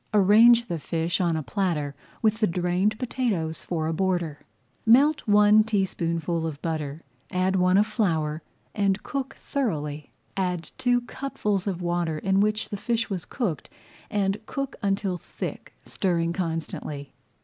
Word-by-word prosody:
Arrange 225 +4 +7
the 170 -7 -3
fish 165 +4 -1
on 170 -2 +2
a 155 - -3
platter 150 -1 -1 0.3
with 220 0 +3
the 215 - +3
drained 180 +5 +1
potatoes 215 -11 -2
for 160 -3 -2
a 160 - 0
border. 175 -4 0 0.4
Melt 280 +7 +5
one 210 +1 +6
teaspoonful 170 -5 -1
of 145 -3 -6
butter, 155 -2 -3 0.3
add 185 +1 +1
one 185 0 +4
of 205 - +5
flour, 165 -8 0 0.3
and 200 -1 +1
cook 275 -2 -4
thoroughly. 150 - -3 0.3
Add 180 -3 -2
two 245 -1 +3
cupfuls 210 -6 -2
of 180 -2 -2
water 175 -2 0
in 195 +4 +1
which 215 +1 +1
the 205 - -4
fish 225 +2 -1
was 180 -4 -3
cooked 210 - -3 0.4
and 200 0 0
cook 275 -1 -3
until 195 -2 0
thick, - - -7
stirring 170 -3 0
constantly. 160 -4 -4
185 Hz, 145 wpm, -26 LUFS, 165-215 Hz, 0.4 s, Arrange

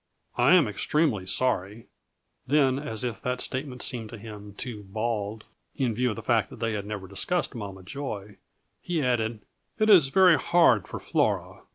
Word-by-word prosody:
I 125 +8 +5
am 165 -8 +5
extremely 105 - 0
sorry." 105 -1 0 0.6
Then, 135 -1 +3
as 115 -6 -1
if 120 -3 -3
that 125 0 -2
statement 130 -1 -4
seemed 115 -4 -2
to 115 - -8
him 105 -2 -10
too 120 -4 -6
bald, 110 +1 -3 0.3
in 125 -5 0
view 125 +3 +1
of 110 - -3
the 115 - -8
fact 110 -3 +2
that - - -10
they 115 -1 -1
had 100 -1 -4
never 105 -3 -5
discussed 170 - -2
Mama 100 -5 -7
Joy, 105 -4 -6 0.4
he 170 -4 -1
added, 115 -3 -1 0.3
"It 215 -1 +4
is 170 -9 +7
very 180 +3 +5
hard 130 - +4
for - - -6
Flora. - - -1
115 Hz, 175 wpm, -27 LUFS, 105-135 Hz, 0.6 s, is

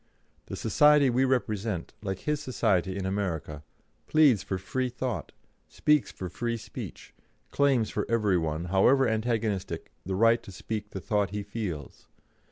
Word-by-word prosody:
The - - -5
society 150 +2 +4
we 130 +2 +3
represent, 110 -7 -1
like 95 -3 -4
his 150 -1 -1
society 95 - 0
in 95 - -3
America, 85 -6 -3 0.5
pleads 145 -10 +5
for 95 - -3
free 125 +7 -2
thought, 125 -1 -4 0.4
speaks 150 -2 +2
for 95 - -6
free 115 +6 -3
speech, 110 - -9 0.4
claims 135 -6 +2
for - - -2
every 105 -6 +2
one, 80 +1 -2
however 130 +8 +5
antagonistic, 110 -6 -1
the 95 +1 -3
right 115 +3 +4
to - - -11
speak 105 +2 -5
the 95 - -6
thought 105 +2 0
he 105 0 -4
feels. 100 -9 -6
105 Hz, 150 wpm, -28 LUFS, 95-125 Hz, 0.5 s, pleads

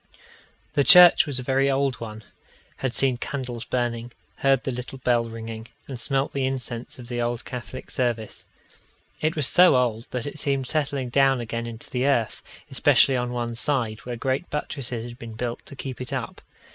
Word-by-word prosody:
The 145 -2 +3
church 175 +6 +9
was 140 -3 -1
a 130 - -3
very 135 +2 +2
old 135 -2 0
one 110 -1 -7 0.5
had 130 -2 -2
seen 130 -2 +3
candles 125 -3 -4
burning, 120 -1 -2 0.3
heard 135 -2 +2
the 135 - -2
little 125 +2 -6
bell 120 -2 +1
ringing, 115 0 -7 0.2
and 130 -3 -6
smelt 135 +4 0
the 140 - -1
incense 130 +1 -2
of 125 -2 -10
the 120 -1 -3
old 120 0 -2
Catholic 125 +1 -7
service. 120 -4 -2 0.7
It 155 +1 +1
was 150 -3 +4
so 180 +1 +6
old, 120 -2 0
that 125 -2 -4
it 145 +1 -6
seemed 140 -3 0
settling 140 -3 -1
down 135 0 +3
again 115 0 -4
into 115 -1 -9
the 125 +2 0
earth, 120 -6 +1 0.3
especially 135 - +4
on 125 -1 -1
one 120 -1 -3
side, 115 -3 -1
where 125 -1 -6
great 130 +7 -2
buttresses 125 -5 -3
had 120 +1 -10
been 115 -3 -8
built 120 +1 -4
to - - -10
keep 130 -2 -6
it 125 - -5
up. - - -4
125 Hz, 185 wpm, -24 LUFS, 120-135 Hz, 0.7 s, church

